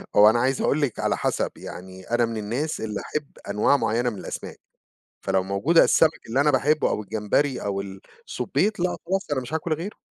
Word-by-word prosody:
هو 105 +1 +8
أنا 120 +2 +2
عايز 130 +2 +1
أقول 155 - +1
لِك، 135 -6 -1
على - - 0
حسب - - -1
يعني، 95 +1 -9
أنا 120 0 +3
من 115 -1 -4
الناس 120 +9 -2
اللي 105 -2 -3
أحب 150 -2 -5 0.2
أنواع 105 +7 +3
معينة 120 +1 0
من 105 - -7
الأسَمَاك. - - -7 0.6
فلو 95 -1 +1
موجودة 100 - +3
السَّمك 160 -1 +3
اللي 130 +5 +1
أنا 150 +1 +4
باحبه، 145 +3 +2
أو 105 - -1
الجمبري، 110 +7 0
أو 100 -1 -2
السبيط، 140 - -3
لأ، 180 0 0
خلاص 190 -3 -1
أنا 135 - +1
مش 125 +5 -6
هاكل 160 +1 -2
غيره. 180 +7 -6
125 Hz, 195 wpm, -24 LUFS, 105-150 Hz, 0.6 s, هو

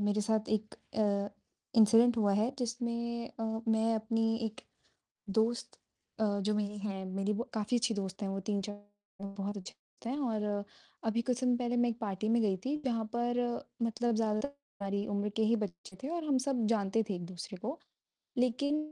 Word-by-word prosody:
मेरे 205 +1 +2
साथ 215 +1 +1
एक 215 0 0
अ, 200 -2 0 0.5
इंसिडेंट 230 +2 +7
हुआ 205 -3 +4
है 215 +4 +3
जिसमें 235 -1 -2
अ, 225 - -8 0.3
मैं 225 0 +4
अपनी 225 0 +1
एक 220 - -6 0.8
दोस्त 230 +2 +1 0.4
अ, - - +4 0.2
जो 210 +2 +1
मेरी 210 0 -1
है, 195 -2 -3
मेरी 195 +2 0 0.2
काफ़ी 215 +2 +1
अच्छी 235 -1 +2
दोस्त 195 -1 -4
हैं, 200 - 0
वो 195 0 -2
3-4 205 0 -2 0.4
बहुत 200 +1 -4
अच्छे 190 -2 -7
दोस्त - - -19
हैं 250 +4 0
और 210 -6 0 0.4
अभी 225 +1 +2
कुछ 245 0 0
समय 250 -1 +3
पहले 245 0 0
मैं 240 0 +4
एक 230 - -5
पार्टी 210 -1 -1
में 235 +1 +4
गई 200 -3 +3
थी 280 +3 +1
जहाँ 230 -4 +1
पर 240 +1 +1 0.4
मतलब 230 +1 +1
ज़्यादातर 215 +2 +1
हमारी 200 -8 -4
उम्र 205 0 0
के 220 - +3
ही 230 +2 +4
बच्चे 185 -3 -5
थे 270 - -2
और 335 - -2
हम 280 -4 +3
सब 245 -5 +2
जानते 215 -1 +2
थे - - +1
एक-दूसरे 175 +2 -6
को। 270 +9 -3 0.6
लेकिन 255 +4 +2
220 Hz, 180 wpm, -33 LUFS, 205-235 Hz, 0.8 s, इंसिडेंट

